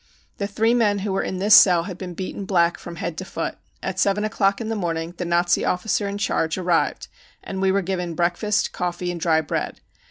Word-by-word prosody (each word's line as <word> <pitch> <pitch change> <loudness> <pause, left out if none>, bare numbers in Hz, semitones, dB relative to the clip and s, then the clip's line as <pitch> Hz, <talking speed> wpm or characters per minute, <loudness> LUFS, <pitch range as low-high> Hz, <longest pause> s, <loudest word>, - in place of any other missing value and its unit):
The 200 - -1
three 225 +3 +1
men 215 -4 +3
who 200 - -1
were 195 - +1
in 185 - -3
this 205 +3 +3
cell 180 -5 +8
had 185 0 -6
been 180 -2 -6
beaten 190 +2 -5
black 175 -3 +2
from 170 - -8
head 165 0 -4
to - - -4
foot. - - -5 0.2
At - - -3
seven 200 +1 +2
o'clock 200 -2 +1
in 230 - -4
the 225 - -2
morning 170 -3 -3
the 180 - -3
Nazi 175 +1 +2
officer 200 +2 0
in 200 0 -3
charge 165 -5 0
arrived 175 -2 0 0.4
and 190 -1 -5
we 190 0 +3
were 195 0 +1
given 180 -2 -3
breakfast, 175 +5 0
coffee 180 0 -3
and 170 -1 -6
dry 160 -2 +3
bread. 150 - -3
185 Hz, 220 wpm, -23 LUFS, 175-200 Hz, 0.4 s, cell